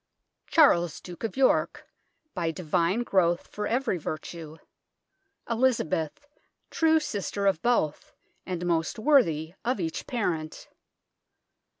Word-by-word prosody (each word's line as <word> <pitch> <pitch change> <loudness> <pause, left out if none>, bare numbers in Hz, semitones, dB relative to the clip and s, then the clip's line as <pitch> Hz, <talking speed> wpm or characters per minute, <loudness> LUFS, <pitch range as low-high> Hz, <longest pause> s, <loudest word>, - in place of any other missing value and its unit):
Charles 175 - +4
Duke 175 +2 -11
of 225 - -3
York, 265 -1 +2 0.5
by 170 -3 -1
Divine 170 +5 0
growth 175 -6 +2
for 210 0 -4
every 240 -6 0
virtue. 155 0 -6 0.9
Elizabeth 230 - 0 0.5
true 320 -1 +3
sister 205 -7 -3
of 190 -5 +2
both, 235 -11 0 0.3
and 180 -1 -4
most 165 -2 0
worthy 175 - +3
of 240 -1 0
each 165 -3 -4
parent. 165 -10 -3
180 Hz, 105 wpm, -27 LUFS, 165-240 Hz, 0.9 s, Charles